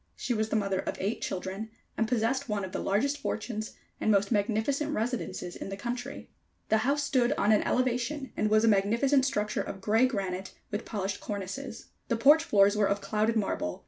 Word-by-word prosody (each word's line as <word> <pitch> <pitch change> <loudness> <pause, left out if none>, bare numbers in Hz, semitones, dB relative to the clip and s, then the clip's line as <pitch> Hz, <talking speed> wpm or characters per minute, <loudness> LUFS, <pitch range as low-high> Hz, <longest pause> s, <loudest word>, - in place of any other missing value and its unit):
She 245 - -2
was 220 -1 0
the - - -1
mother 195 -3 +1
of - - -3
eight 200 +4 -2
children, 190 +4 -4 0.3
and 225 - +1
possessed 250 +3 0
one 205 -2 -1
of 185 - -8
the - - -3
largest 275 +9 0
fortunes 220 -4 -3 0.3
and - - 0
most 200 0 +3
magnificent 230 +8 0
residences 215 -6 -3
in - - -6
the 195 - -5
country. 240 +4 -5 0.4
The 220 - +4
house 280 +6 +1
stood 265 -2 +2
on 210 -6 +2
an 210 - +5
elevation, 255 +2 -1
and 215 - +1
was 215 +1 +4
a - - +3
magnificent 230 +7 +3
structure 210 -5 0
of 195 - -6
grey 220 +6 +3
granite, 190 -5 -4 0.2
with 210 +2 -3
polished 200 -2 -3
cornices. 210 +5 -6 0.2
The 230 - 0
porch 295 +7 +6
floors 205 -8 +4
were 210 -1 +3
of 200 0 +1
clouded 215 +2 0
marble. 195 - -1
220 Hz, 195 wpm, -29 LUFS, 200-250 Hz, 0.4 s, porch